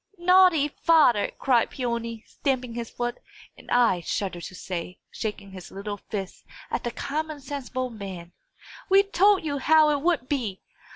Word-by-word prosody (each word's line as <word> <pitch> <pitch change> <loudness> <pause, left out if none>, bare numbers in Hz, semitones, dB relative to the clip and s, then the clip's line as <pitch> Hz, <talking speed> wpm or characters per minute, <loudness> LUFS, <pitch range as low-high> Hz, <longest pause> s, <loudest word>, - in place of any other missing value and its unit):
"Naughty 355 -4 +5
father!" 295 -9 +3
cried 245 -3 +2
Peony, 235 -3 -3
stamping 255 -3 -2
his 235 -1 -5
foot, 240 0 -4 0.4
and - - -16
I 235 -7 +3
shudder 175 +1 -3
to 185 - -8
say 180 -1 -5
shaking 210 -3 -5
his 185 -2 -10
little 205 +1 -6
fist 195 -1 -6 0.3
at - - -2
the 240 - -1
common 305 +4 -4
sensible 260 -2 -4
man. 190 -5 -8 0.6
"We 390 +1 +6
told 400 -2 +3
you 285 -2 -2
how 310 +2 +5
it 290 -1 0
would 325 -5 +1
be! 235 -10 -3
245 Hz, 155 wpm, -26 LUFS, 205-300 Hz, 0.6 s, We